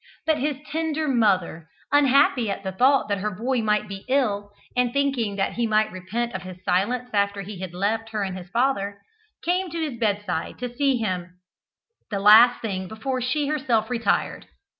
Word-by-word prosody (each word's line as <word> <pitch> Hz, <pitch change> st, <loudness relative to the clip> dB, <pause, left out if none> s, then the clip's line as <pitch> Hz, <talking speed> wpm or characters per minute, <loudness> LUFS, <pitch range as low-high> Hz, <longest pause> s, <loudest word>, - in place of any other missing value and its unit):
But 315 Hz, -1 st, +2 dB
his 290 Hz, 0 st, -1 dB
tender 315 Hz, 0 st, -1 dB
mother, 190 Hz, -, +1 dB, 0.2 s
unhappy 275 Hz, -4 st, +4 dB
at 195 Hz, 0 st, -4 dB
the 190 Hz, -, -3 dB
thought 260 Hz, +8 st, +3 dB
that 200 Hz, -1 st, -1 dB
her 210 Hz, +3 st, -1 dB
boy 235 Hz, +5 st, -1 dB
might 210 Hz, -1 st, +1 dB
be 195 Hz, -1 st, -8 dB
ill, 210 Hz, -7 st, +1 dB, 0.3 s
and 250 Hz, -1 st, +2 dB
thinking 270 Hz, -7 st, 0 dB
that 195 Hz, -1 st, -1 dB
he 235 Hz, -1 st, 0 dB
might 215 Hz, 0 st, +2 dB
repent 210 Hz, +6 st, -3 dB
of 190 Hz, -, -4 dB
his 185 Hz, 0 st, -10 dB
silence 240 Hz, +8 st, 0 dB
after 200 Hz, -1 st, 0 dB
he 200 Hz, -1 st, -8 dB
had 185 Hz, -2 st, -6 dB
left 220 Hz, +4 st, -1 dB
her 215 Hz, -2 st, -2 dB
and 190 Hz, -1 st, -4 dB
his 180 Hz, -1 st, -9 dB
father, 215 Hz, -4 st, 0 dB, 0.5 s
came 360 Hz, +1 st, 0 dB
to 335 Hz, +1 st, -5 dB
his 295 Hz, -7 st, -3 dB
bedside 205 Hz, -6 st, -1 dB
to 245 Hz, -1 st, -5 dB
see 275 Hz, -1 st, +2 dB
him 180 Hz, -5 st, -3 dB, 0.7 s
the 200 Hz, -, -2 dB
last 220 Hz, +5 st, +7 dB
thing 190 Hz, -4 st, -3 dB
before 255 Hz, +5 st, -3 dB
she 285 Hz, +4 st, 0 dB
herself 260 Hz, -7 st, 0 dB
retired. 235 Hz, -2 st, -1 dB
220 Hz, 180 wpm, -24 LUFS, 195-260 Hz, 0.7 s, last